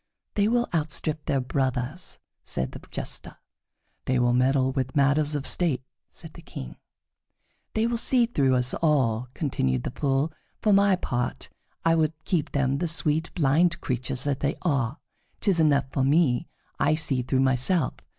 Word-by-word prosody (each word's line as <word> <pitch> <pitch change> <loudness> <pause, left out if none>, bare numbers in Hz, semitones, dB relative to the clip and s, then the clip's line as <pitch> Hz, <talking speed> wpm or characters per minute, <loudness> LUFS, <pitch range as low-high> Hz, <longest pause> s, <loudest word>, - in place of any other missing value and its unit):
"They 205 0 +2
will 240 +1 +2
outstrip 155 -1 -1
their 140 -3 +1
brothers," 130 +5 -2 0.3
said 65 - -2
the - - -9
Jester. - - -6 0.7
"They 130 - +1
will 120 0 +3
meddle 130 +1 +2
with 130 -1 -3
matters 145 +1 +3
of 145 -1 -3
state," 155 -8 +1 0.3
said - - -12
the - - -12
King. 60 -1 -9 1.0
"They 220 +1 +2
will 235 0 0
see 245 0 +3
through 140 - +2
us 125 0 +2
all," 130 -7 +1
continued 65 - -1
the - - -3
Fool. 140 +3 0 0.3
"For 210 - +3
my 200 -1 +5
part, 120 - -3 0.4
I 165 - +5
would 160 -1 +2
keep 170 -6 0
them 140 -1 0
the 175 - 0
sweet, 160 0 0
blind 165 +3 +3
creatures 125 -1 -2
that 145 -2 -1
they 145 +2 0
are. 140 -5 0 0.4
'Tis 190 -5 +2
enough 145 -3 +3
for 135 - 0
me 140 0 +2 0.3
that - - +2
I 155 - +4
see 140 -5 0
through 130 +1 0
myself. 135 +7 +2
145 Hz, 165 wpm, -26 LUFS, 130-165 Hz, 1.0 s, my